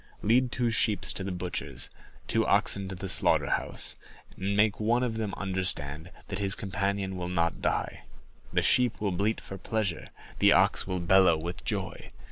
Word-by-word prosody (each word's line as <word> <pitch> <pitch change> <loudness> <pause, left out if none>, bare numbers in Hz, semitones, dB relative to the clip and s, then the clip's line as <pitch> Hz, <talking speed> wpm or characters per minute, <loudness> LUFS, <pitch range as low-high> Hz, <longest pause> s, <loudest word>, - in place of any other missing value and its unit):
Lead 120 +3 +3
two 120 -2 0
sheep 110 -3 +1
to 95 - -1
the 95 - -3
butcher's, 90 0 -5 0.4
two - - +2
oxen 100 -1 +2
to 95 - -6
the 95 +2 -6
slaughterhouse, - - +2 0.4
and 100 +1 -2
make 105 -1 +3
one 115 +3 +2
of 120 -3 -1
them 110 -2 -2
understand 90 -5 -1 0.2
that 95 -1 -4
his 100 0 +3
companion 100 -1 -2
will 90 -1 -4
not 85 -2 0
die; - - -2 0.5
the - - +1
sheep 125 -2 +3
will 105 -2 -1
bleat 100 +5 0
for 95 - -9
pleasure, 110 -6 -2 0.3
the - - +6
ox - - +3
will 95 -1 -2
bellow 90 -1 +5
with 85 +2 -6
joy. - - -4
95 Hz, 170 wpm, -28 LUFS, 90-105 Hz, 0.5 s, the